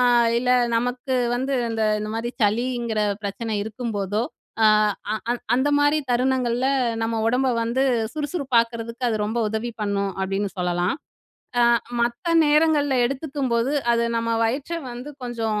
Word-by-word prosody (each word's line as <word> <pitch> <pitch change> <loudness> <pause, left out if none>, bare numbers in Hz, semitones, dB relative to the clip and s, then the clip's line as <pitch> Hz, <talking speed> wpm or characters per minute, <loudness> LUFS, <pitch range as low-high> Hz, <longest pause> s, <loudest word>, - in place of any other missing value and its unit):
அ - - +4 0.4
இல்ல 250 +1 0 0.3
நமக்கு 250 +2 -1 0.2
வந்து 265 +3 -1 0.2
அந்த 225 -1 -1 0.2
இந்த 215 - -4
மாரி 235 +1 -2
சளிங்கற 235 +1 0 0.2
பிரச்சன 215 +2 -3
இருக்கும் 225 +1 -5
போதோ 205 +3 -1 0.4
ஆ - - +8 0.5
அ 220 +2 -3 0.2
அந்த 260 +3 +2
மாரி 290 +1 +3
தருணங்கள்ல 250 0 +1 0.4
நம்ம 225 0 -1
உடம்ப 255 +3 +2
வந்து 235 +3 0 0.3
சுறுசுறுப்பாக்கறதுக்கு 245 -6 -1
அது 220 - 0
ரொம்ப 220 +3 -2
உதவி 220 +3 -3
பண்ணும் 200 -1 0
அப்டின்னு 195 +1 -1
சொல்லலாம். 180 0 0 0.7
ஆ - - +6 0.4
மத்த 235 +4 -1 0.2
நேரங்கள்ல 295 -2 +3
எடுத்துக்கும் 275 0 -3
போது 235 +4 +1 0.2
அது 235 0 +2
நம்ம 230 0 -1
வயிற்ற 275 +8 -2 0.2
வந்து 250 +5 -7
கொஞ்சம் 225 -3 -2
235 Hz, 140 wpm, -23 LUFS, 220-260 Hz, 0.7 s, ஆ